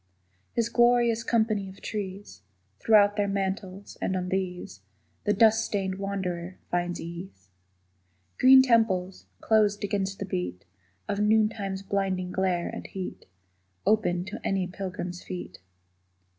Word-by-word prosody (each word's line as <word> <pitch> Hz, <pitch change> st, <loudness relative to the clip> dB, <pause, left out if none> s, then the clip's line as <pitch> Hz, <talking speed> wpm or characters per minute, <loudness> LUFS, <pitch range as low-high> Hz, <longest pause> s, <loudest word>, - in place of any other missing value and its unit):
His 235 Hz, -1 st, +1 dB
glorious 240 Hz, -1 st, +3 dB
company 220 Hz, -5 st, +1 dB
of 190 Hz, -, -13 dB
trees 195 Hz, -, -6 dB, 0.4 s
Throw 215 Hz, -2 st, +6 dB
out 205 Hz, +1 st, -1 dB
their 205 Hz, -1 st, +2 dB
mantles, 195 Hz, 0 st, -4 dB
and 190 Hz, -, 0 dB
on 180 Hz, 0 st, -3 dB
these 180 Hz, -, -3 dB, 0.4 s
The 210 Hz, -, +3 dB
dust 220 Hz, +2 st, +5 dB
stained 195 Hz, -3 st, -2 dB
wanderer 185 Hz, -3 st, -3 dB
finds 175 Hz, 0 st, -1 dB
ease. 170 Hz, -, -9 dB, 0.9 s
Green 260 Hz, 0 st, +8 dB
temples, 205 Hz, -7 st, +1 dB
closed 210 Hz, -2 st, +2 dB
against 195 Hz, -1 st, -1 dB
the 195 Hz, -, -4 dB
beat 90 Hz, -, -4 dB, 0.4 s
Of 200 Hz, -, -2 dB
noontime's 210 Hz, -2 st, +1 dB
blinding 190 Hz, -2 st, -1 dB
glare 185 Hz, -2 st, 0 dB
and -, -, -6 dB
heat, 190 Hz, -2 st, -7 dB, 0.6 s
Open 185 Hz, -5 st, +2 dB
to 190 Hz, -, -7 dB
any 195 Hz, -2 st, 0 dB
pilgrim's 180 Hz, -1 st, -5 dB
feet. 175 Hz, -, -7 dB
195 Hz, 130 wpm, -27 LUFS, 180-210 Hz, 0.9 s, Green